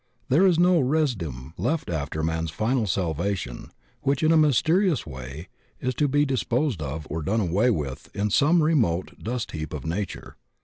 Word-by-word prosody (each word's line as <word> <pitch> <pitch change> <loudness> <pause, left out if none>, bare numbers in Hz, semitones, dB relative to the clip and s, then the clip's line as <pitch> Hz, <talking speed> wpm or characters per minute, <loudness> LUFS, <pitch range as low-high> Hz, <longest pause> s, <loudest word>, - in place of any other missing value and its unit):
There 165 +9 +5
is 175 -3 +3
no 175 0 +5
residuum 110 - -1
left 140 - -1
after 80 -1 -3
man's 80 0 -1
final 110 - 0
salvation 85 -5 -2 0.3
which 140 +2 0
in 155 - +4
a - - +5
mysterious 160 - +3
way 65 +4 -8 0.3
is 130 - -1
to 145 +4 +1
be 145 +2 +2
disposed 130 - 0
of 75 +2 -4
or 80 +2 -3
done 105 +9 0
away 100 +5 +2
with 75 - -3
in 105 0 0
some 155 - +4
remote 115 - +1
dust 120 +1 -3
heap 75 -2 -5
of 70 - -7
nature. 95 +4 -4
105 Hz, 170 wpm, -25 LUFS, -, 0.3 s, There